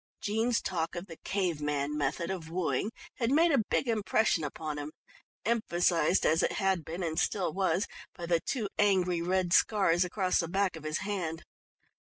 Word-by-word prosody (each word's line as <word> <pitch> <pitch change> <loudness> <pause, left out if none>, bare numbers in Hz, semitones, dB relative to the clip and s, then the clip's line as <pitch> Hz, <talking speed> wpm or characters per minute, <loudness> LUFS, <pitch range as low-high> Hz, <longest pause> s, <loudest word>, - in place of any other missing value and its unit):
Jean's 225 +3 0
talk 165 -2 -2
of 175 +2 -5
the 165 -4 -11
cave 180 -6 -1
man 145 0 -1
method 150 +5 -1
of 170 -4 -5
wooing 180 +4 -1 0.3
had 230 -2 0
made 325 +5 +4
a 270 -6 +3
big - - +1
impression 215 -5 +2
upon 150 0 -4
him, 145 +1 -5 0.5
emphasised 175 -7 +2
as 160 +1 +4
it - - +1
had 190 -4 +1
been, 170 +4 -5
and 160 0 -1
still 185 -6 0
was, 195 0 +1 0.3
by 175 - -6
the 170 -1 +2
two 225 +3 -2
angry 185 -4 +3
red 180 0 +1
scars 190 -6 +4
across 185 +1 0
the 165 - 0
back 190 +1 0
of 160 -1 -10
his 155 +3 -2
hand. 175 -6 -3
180 Hz, 180 wpm, -30 LUFS, 160-200 Hz, 0.5 s, made